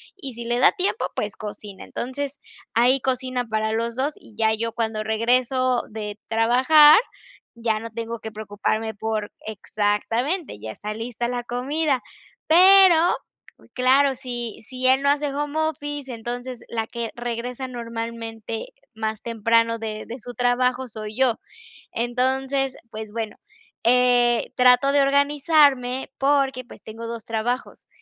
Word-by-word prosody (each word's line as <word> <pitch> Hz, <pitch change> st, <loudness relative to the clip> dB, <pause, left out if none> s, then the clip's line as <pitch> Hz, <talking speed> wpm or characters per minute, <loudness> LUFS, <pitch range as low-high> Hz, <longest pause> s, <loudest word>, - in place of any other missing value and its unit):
y, 275 Hz, -10 st, -7 dB
si 235 Hz, 0 st, -8 dB
le 240 Hz, +1 st, 0 dB
da -, -, +6 dB
tiempo, 395 Hz, +3 st, -1 dB
pues, -, -, -3 dB
cocina. 205 Hz, -2 st, -8 dB
Entonces 280 Hz, +3 st, -5 dB, 0.3 s
ahí 250 Hz, +3 st, +4 dB
cocina 255 Hz, -1 st, -1 dB
para 220 Hz, 0 st, -1 dB
los 230 Hz, +1 st, -2 dB
2 280 Hz, +3 st, -1 dB
y 215 Hz, -, -18 dB
ya 220 Hz, -1 st, +3 dB
yo 230 Hz, +1 st, -2 dB
cuando 220 Hz, -2 st, -2 dB
regreso 250 Hz, +3 st, +1 dB
de 210 Hz, -1 st, -6 dB
trabajar 260 Hz, -, +6 dB, 0.6 s
ya 230 Hz, -2 st, -1 dB
no 230 Hz, -, -7 dB
tengo 230 Hz, +1 st, -5 dB
que 220 Hz, -, -7 dB
preocuparme 215 Hz, +1 st, -2 dB
por 215 Hz, 0 st, -3 dB, 0.2 s
exactamente, 220 Hz, -, -1 dB
ya 110 Hz, +1 st, -7 dB
está 210 Hz, -, -6 dB
lista 235 Hz, +1 st, -4 dB
la 245 Hz, -1 st, -3 dB
comida. 270 Hz, +3 st, -1 dB, 0.5 s
Pero 375 Hz, +1 st, +8 dB, 0.8 s
claro, 265 Hz, +2 st, +3 dB
si 240 Hz, -3 st, -6 dB
si 255 Hz, +3 st, -3 dB
él 265 Hz, +1 st, +5 dB
no 280 Hz, -, +2 dB
hace 290 Hz, -1 st, +1 dB
home 295 Hz, +2 st, -3 dB
office, 290 Hz, -3 st, -3 dB
entonces 245 Hz, +2 st, -6 dB
la 225 Hz, -1 st, -2 dB
que 235 Hz, -2 st, -5 dB
regresa 240 Hz, +2 st, -4 dB
normalmente 230 Hz, -, -5 dB, 0.3 s
más 220 Hz, -1 st, -3 dB
temprano 230 Hz, 0 st, +1 dB
de 215 Hz, -1 st, -5 dB
de 240 Hz, +3 st, -8 dB
su 245 Hz, +1 st, -9 dB
trabajo 250 Hz, +1 st, +1 dB
soy 215 Hz, -1 st, -7 dB
yo. 260 Hz, -3 st, +2 dB, 0.5 s
Entonces, 260 Hz, +3 st, 0 dB, 0.2 s
pues, 215 Hz, -1 st, -7 dB
bueno, 225 Hz, -1 st, -4 dB, 0.5 s
eh, 245 Hz, 0 st, +3 dB
trato 250 Hz, +2 st, +5 dB
de 285 Hz, 0 st, +4 dB
organizarme 280 Hz, -2 st, +3 dB
porque, 275 Hz, -2 st, +2 dB
pues, -, -, -14 dB
tengo 225 Hz, +1 st, -8 dB
2 230 Hz, -2 st, -6 dB
trabajos, 230 Hz, +3 st, -3 dB
245 Hz, 140 wpm, -23 LUFS, 225-265 Hz, 0.8 s, Pero